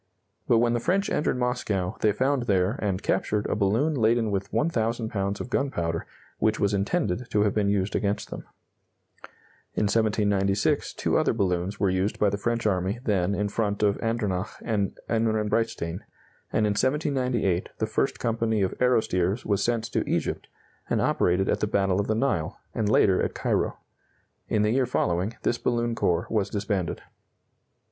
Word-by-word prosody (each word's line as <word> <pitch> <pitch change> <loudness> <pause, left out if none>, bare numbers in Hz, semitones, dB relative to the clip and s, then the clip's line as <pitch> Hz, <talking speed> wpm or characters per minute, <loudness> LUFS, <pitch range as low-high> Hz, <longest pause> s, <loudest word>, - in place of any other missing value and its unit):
But 115 - +5
when 120 +1 +3
the 120 - +1
French 195 - 0
entered 150 - +1
Moscow, 105 -7 -1
they 105 - +4
found 130 +3 0
there, 95 -1 +2
and 100 -2 -1
captured, 105 -1 0
a - - 0
balloon 110 +10 +2
laden 115 -3 +2
with 100 0 -2
1,000 115 -7 0
pounds 100 -2 -2
of 125 - -6
gunpowder 85 -14 -1 0.3
which 110 0 +1
was 100 0 +1
intended 110 - -1
to 105 -2 +2
have 105 - +1
been 105 -2 +1
used 100 0 0
against 100 0 -1
them. - - -5 1.4
In - - +1
1796 100 -2 +1
two - - +1
other - - +2
balloons 95 -2 -1
were 95 -2 +2
used 95 +3 0
by 105 -1 +2
the 100 - -2
French 115 +2 -1
army 95 +1 0
then 100 -4 +1
in 105 0 0
front 105 0 -1
of 100 -1 +2
Andernach 105 -4 -1 0.2
and 105 -4 -1
Ehrenbreitstein, 110 -5 0 0.5
and 110 - +2
in 105 - +2
1798 125 - 0
the - - 0
1st - - -1
Company 115 -2 0
of 95 - 0
Aerostiers 110 -5 +1
was 100 -2 +1
sent 115 -2 0
to - - +1
Egypt, - - -1 0.4
and - - +1
operated 90 +2 +2
at - - +1
the 105 - 0
battle 95 -2 +1
of 100 - -1
the 110 - +1
Nile, 105 -8 0 0.2
and 110 -3 0
later 95 -3 +4
at - - -2
Cairo. - - 0 0.7
In 105 - +1
the 105 - +2
year 130 +1 +2
following, 95 -2 0
this 120 - 0
balloon 120 -1 0
corps 90 -6 +1
was 105 -3 0
disbanded. 100 -4 -2
105 Hz, 170 wpm, -26 LUFS, 95-115 Hz, 1.4 s, But